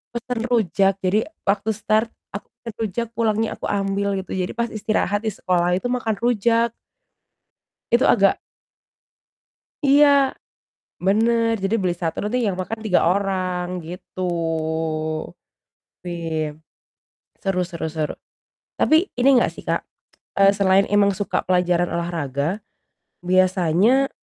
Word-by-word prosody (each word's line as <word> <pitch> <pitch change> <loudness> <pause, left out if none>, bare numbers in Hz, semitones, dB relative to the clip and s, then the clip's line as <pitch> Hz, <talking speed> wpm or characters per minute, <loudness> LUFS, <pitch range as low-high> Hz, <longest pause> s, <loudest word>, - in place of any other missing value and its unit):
pesan 235 0 -3
rujak. 195 -4 +2
Jadi 205 +7 +1 0.2
waktu 200 +2 0
start, 215 +2 +1 0.2
aku 200 - -7 0.2
pesan 230 -2 -6
rujak, 225 +2 -2
pulangnya 220 -1 0
aku - - -3
ambil 200 0 -1
gitu. 190 -1 -5
Jadi 185 -1 -2
pas 235 0 -2
istirahat 215 0 -1
di - - +1
sekolah 180 -1 +1
itu 245 +6 -2
makan 230 -3 -1
rujak. 235 0 +2 1.2
Itu - - +4
agak - - +4 1.5
Iya, 285 +2 +6 1.0
bener. 230 +3 +3
Jadi 195 +3 +1
beli 180 -2 +1
satu 165 -2 -4
nanti 245 +4 0
yang 200 -5 -1
makan 220 +5 -4
3 205 -7 +2
orang, 185 -1 -1
gitu. 180 +2 -9 1.8
Wih, 160 -3 -3 0.9
seru 190 -2 0
seru 170 -3 -4
seru. 155 -2 -2 0.7
Tapi 315 - +4 0.2
ini 255 - +3
enggak - - +1
sih, - - -11
Kak, - - 0 0.6
eee, 195 0 +7
selain 195 0 +4
emang 205 -1 +3
suka 200 +1 -2
pelajaran 180 -1 +2
olahraga, 170 +2 -2 0.6
biasanya 185 +8 +3
195 Hz, 120 wpm, -22 LUFS, 180-225 Hz, 1.8 s, eee